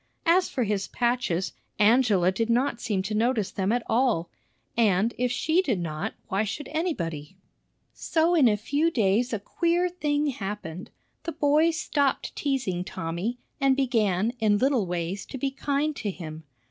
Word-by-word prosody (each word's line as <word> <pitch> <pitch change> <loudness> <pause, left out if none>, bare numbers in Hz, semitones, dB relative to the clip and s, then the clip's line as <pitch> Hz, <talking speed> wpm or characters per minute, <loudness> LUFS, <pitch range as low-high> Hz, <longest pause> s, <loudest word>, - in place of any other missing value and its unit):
As 355 +2 +4
for 255 - -1
his 200 -2 -1
patches, 235 -8 0 0.2
Angela 210 -5 +4
did 225 +4 -1
not 240 0 +1
seem 200 -4 -1
to 205 +3 -3
notice 220 -1 +1
them 195 +1 -1
at 240 0 +1
all; 225 -8 +1 0.4
and, 220 0 +3
if 250 0 0
she 320 +7 +2
did 250 - -1
not, 155 -3 -4
why 195 +3 0
should 220 +7 -4
anybody? 175 - -3 0.6
So 330 +1 +1
in 305 -7 +5
a 210 -2 +3
few 285 +10 +1
days 230 -2 +1
a 225 - 0
queer 340 - 0
thing 300 -4 0
happened. 195 -6 -6 0.3
The 335 - -5
boys 310 +2 +3
stopped 285 -6 0
teasing 250 -11 -1
Tommy, 175 +8 -4 0.2
and 275 -1 +4
began 225 -5 +1
in 210 -2 +3
little 250 -4 +2
ways 175 +2 -3
to - - -6
be 270 +1 -1
kind 285 +2 -1
to 210 - -2
him. 160 -4 -7
230 Hz, 160 wpm, -26 LUFS, 195-280 Hz, 0.6 s, in